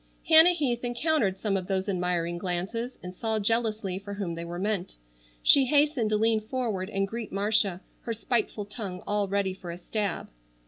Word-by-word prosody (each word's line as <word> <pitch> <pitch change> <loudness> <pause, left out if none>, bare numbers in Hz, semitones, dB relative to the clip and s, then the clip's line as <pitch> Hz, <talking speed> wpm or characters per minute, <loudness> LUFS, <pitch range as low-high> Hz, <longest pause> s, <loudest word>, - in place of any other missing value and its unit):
Hannah 325 +2 +8
Heath 255 -8 -1
encountered 245 - +1
some 200 0 -1
of 185 -2 -2
those 190 0 -1
admiring 175 -2 -1
glances 195 +7 -3
and 180 0 -7
saw 220 +3 -1
jealously 215 -3 0
for 200 0 -7
whom 195 -4 -3
they 165 0 -5
were 170 +1 -6
meant. 195 -1 -2 0.5
She 275 -2 +7
hastened 285 -4 +2
to 215 - +2
lean 220 0 +2
forward 215 -5 -2
and 195 -1 -1
greet 225 +1 -6
Marcia, 200 -2 +1 0.2
her 230 - -3
spiteful 225 -2 -1
tongue 200 -4 -6
all 205 -1 0
ready 195 -1 0
for 185 -2 -10
a 170 - -5
stab. 200 +1 -3
205 Hz, 180 wpm, -27 LUFS, 185-230 Hz, 0.5 s, Hannah